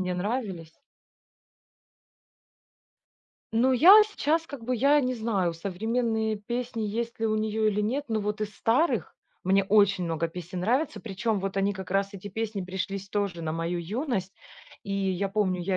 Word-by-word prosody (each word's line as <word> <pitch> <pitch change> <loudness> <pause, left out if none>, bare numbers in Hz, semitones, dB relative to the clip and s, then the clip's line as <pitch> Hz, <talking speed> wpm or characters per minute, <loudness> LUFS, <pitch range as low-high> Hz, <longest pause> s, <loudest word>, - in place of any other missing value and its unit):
мне 180 -1 -1
нравились. 190 -5 -3 2.8
Ну, 245 +4 +3
я 360 - +9
сейчас 325 -4 0
как 270 -6 -9
бы, 250 +1 0
я 280 +5 +4
не 255 -2 -1
знаю, 205 -7 0
современные 220 +4 -1
песни 235 +2 -4
есть 230 +3 -3
ли 225 - +2
у 215 0 +1
нее 215 0 +1
или 210 0 0
нет, 260 +8 -1
но 220 -1 0
вот 210 +1 -3
из 210 -1 -3
старых 255 +10 +1 0.3
мне 195 +2 +4
очень 200 -2 +4
много 165 0 -1
песен 180 +2 -6
нравится. 255 - 0
Причем 215 +1 -2
вот 195 0 -4
они 195 +1 +2
как 190 -2 -8
раз 195 +1 0
эти 195 +1 -7
песни 215 -1 -3
пришлись 190 +1 -4
тоже 200 -5 -2
на 155 -1 -2
мою 165 +2 -2
юность. 195 - -3 0.5
И 200 - -5
я 195 0 0
помню, 195 -3 0
я 185 +1 0
205 Hz, 165 wpm, -27 LUFS, 190-230 Hz, 2.8 s, я